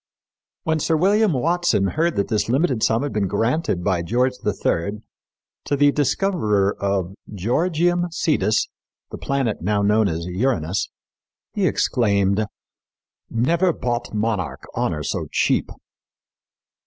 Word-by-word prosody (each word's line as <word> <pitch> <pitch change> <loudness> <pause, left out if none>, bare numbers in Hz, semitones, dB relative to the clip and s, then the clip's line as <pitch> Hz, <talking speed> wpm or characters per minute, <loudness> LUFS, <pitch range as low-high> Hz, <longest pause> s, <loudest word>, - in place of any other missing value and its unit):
When 160 0 0
Sir 160 +2 +1
William 205 +4 +3
Watson 140 - +1
heard 165 +2 0
that 100 - 0
this 110 -1 0
limited 130 -2 +1
sum 115 +4 +2
had 145 - -3
been 105 -2 0
granted 115 - 0
by 90 -3 +1
George 125 +9 +1
III 100 0 -1 0.6
to 145 - 0
the 145 0 +4
discoverer 135 - +1
of 100 -2 -1 0.2
Georgium 170 - +1
Sidus 155 -9 +1 0.4
the - - -7
planet 135 -6 -1
now 100 +3 +1
known 105 +1 +3
as 85 -1 -3
Uranus 95 - -1 0.6
he - - +1
exclaimed, 100 -2 +1 0.8
"Never 170 +10 +2
bought 120 -5 -3
monarch 105 -5 -2
honor 75 -1 -1
so - - -3
cheap." - - +1
115 Hz, 125 wpm, -22 LUFS, 100-155 Hz, 0.8 s, the